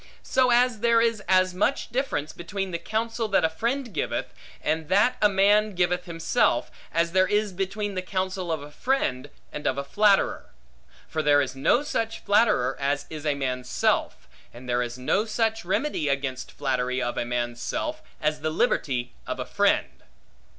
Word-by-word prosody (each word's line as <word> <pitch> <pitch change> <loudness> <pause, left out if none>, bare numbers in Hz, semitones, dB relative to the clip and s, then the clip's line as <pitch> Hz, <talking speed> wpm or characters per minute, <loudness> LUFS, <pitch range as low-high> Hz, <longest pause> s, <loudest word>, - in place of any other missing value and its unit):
So 255 -1 +2
as 245 -1 +3
there 235 +1 +4
is 230 -2 +1
as 185 0 +3
much 230 +7 0
difference 235 - -2
between 195 +2 -4
the 170 - -3
counsel, 225 +2 -2
that 195 -5 +3
a - - +2
friend 235 +6 -2
giveth, - - -2 0.3
and 155 0 -1
that 205 +6 +4
a 210 - +6
man 205 +1 +3
giveth 180 0 +1
himself, 165 -2 +1 0.2
as 170 +1 +1
there 185 +1 +3
is 210 0 0
between 195 +2 -3
the 185 - -2
counsel 185 -1 -3
of 155 -3 -2
a 145 - -11
friend, 150 - -1 0.2
and 150 0 -3
of 130 - 0
a 140 - -1
flatterer. 200 +7 +2 0.6
For 155 - -2
there 145 -1 +4
is 135 -2 -1
no 190 - +2
such 225 -6 -2
flatterer 205 - +3
as 140 +1 0
is 155 -1 -5
a 145 - +2
man's 125 -2 -3
self; - - 0 0.2
and 125 +1 -12
there 120 0 +1
is 120 0 -4
no 165 - +1
such 225 0 0
remedy 175 - -1
against 140 -2 -2
flattery 125 0 -1
of 120 -1 -2
a - - -1
man's 120 0 -3
self, 310 - -3 0.2
as 150 0 -1
the 155 - 0
liberty 130 -5 0
of - - -4
a - - -3
friend. - - +1
180 Hz, 180 wpm, -26 LUFS, 145-215 Hz, 0.6 s, a